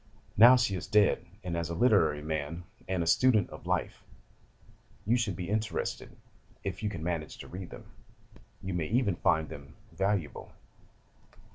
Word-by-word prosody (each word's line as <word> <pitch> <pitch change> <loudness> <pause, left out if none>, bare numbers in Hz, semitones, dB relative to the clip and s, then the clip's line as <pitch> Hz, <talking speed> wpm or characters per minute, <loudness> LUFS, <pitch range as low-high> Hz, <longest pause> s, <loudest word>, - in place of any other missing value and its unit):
Now 120 +4 +9
she 115 -6 +1
is 90 - -5
dead, 105 -1 +3 0.2
and 90 -2 -3
as 85 -1 -2
a 85 - -3
literary 80 -9 +3
man, 80 +2 -3 0.2
and 95 -2 0
a - - -3
student 110 +3 +3
of - - -10
life, - - -2 1.0
you 115 +4 +3
should 115 -6 0
be 90 -1 -5
interested, 110 +1 -3 0.5
if 95 0 -4
you 105 - -1
can 85 -6 -6
manage 80 -3 -3
to - - -10
read 90 -1 -8
them. - - -11 0.8
You 95 0 -3
may 85 -3 -1
even 110 -5 +1
find 80 0 +2
them 70 0 -11 0.2
valuable. 95 -2 -2
90 Hz, 160 wpm, -30 LUFS, 85-105 Hz, 1.0 s, Now